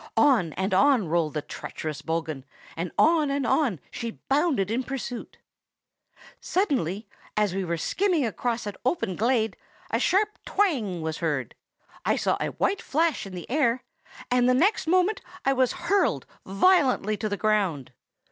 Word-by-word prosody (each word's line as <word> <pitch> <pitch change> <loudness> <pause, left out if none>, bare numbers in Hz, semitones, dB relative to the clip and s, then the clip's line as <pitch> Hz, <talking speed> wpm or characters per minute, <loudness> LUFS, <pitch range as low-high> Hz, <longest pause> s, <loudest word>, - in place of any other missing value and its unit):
On 245 - +4
and 190 +1 -1
on 245 -1 +4
rolled 160 -2 0
the 150 - -2
treacherous 155 0 -6
bogghun, 160 -4 -3 0.3
and 170 +1 -3
on 315 -2 +4
and 275 -1 -1
on 245 - +1
she 230 -2 -5
bounded 275 - +2
in 240 +3 +1
pursuit. 255 -2 -6 1.0
"Suddenly, 225 - -1 0.3
as 210 -3 +2
we 195 0 -1
went 170 -2 -2
skimming 360 -8 +1
across 235 +1 -2
an 205 - -4
open 255 - 0
glade, 225 -1 +1 0.4
a - - +1
sharp 420 +3 +1
twang 235 - 0
was 160 0 -3
heard: 145 -8 -2 0.5
I - - +2
saw - - +1
a - - -1
white 400 - +1
flash 315 -6 0
in 185 - -9
the 175 - -7
air; 250 -3 +1 0.5
and 250 0 +4
the 255 - +4
next 365 - +2
moment 370 +5 +2 0.2
I 270 - +4
was 260 -1 +2
hurled 360 +3 +1 0.2
violently 250 - +3
to 215 - -2
the 205 - -2
ground. 195 - 0
235 Hz, 155 wpm, -26 LUFS, 185-295 Hz, 1.0 s, On